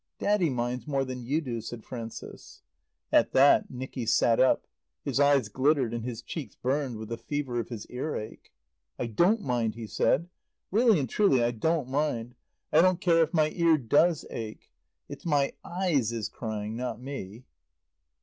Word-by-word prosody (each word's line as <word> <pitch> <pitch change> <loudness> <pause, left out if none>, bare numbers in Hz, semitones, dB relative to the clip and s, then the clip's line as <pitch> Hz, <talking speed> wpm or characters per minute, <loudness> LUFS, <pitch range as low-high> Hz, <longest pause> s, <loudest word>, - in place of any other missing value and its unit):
"Daddy 205 -5 +2
minds 125 -1 -2
more 135 -2 0
than 130 -1 -6
you 140 +7 0
do," 120 -6 -4
said 115 0 -8
Frances. 115 -3 -9 0.5
At - - +4
that 140 +2 +5
Nicky 130 -1 -6
sat 115 +1 +3
up. 130 - +3 0.4
His - - -1
eyes 140 -5 +4
glittered 130 +1 +1
and 115 -1 -3
his 120 -1 -5
cheeks 155 -6 -6
burned 130 -2 -1
with 110 0 -8
the 115 - -3
fever 140 -5 -3
of 115 - -4
his 115 -4 -6
earache. 125 -4 -6 0.5
"I - - -2
don't 175 - +2
mind," 120 -3 0
he 115 -1 -6
said. 160 +9 +1 0.4
"Really 220 -2 +4
and 135 - -1
truly 135 - +3
I 120 - +2
don't 145 +4 0
mind. 130 -4 -1 0.4
I 155 - +7
don't 185 0 +3
care 170 -2 +4
if 160 -1 +2
my 155 -2 +2
ear 170 -2 +3
does 150 +5 +2
ache. 110 -1 -7 0.4
"It's 140 +4 -9
my 145 -5 +1
eyes 170 - 0
is 115 -3 -3
crying, 110 -1 -5
not 125 +1 -4
me." 125 -4 -7
130 Hz, 170 wpm, -28 LUFS, 115-155 Hz, 0.5 s, I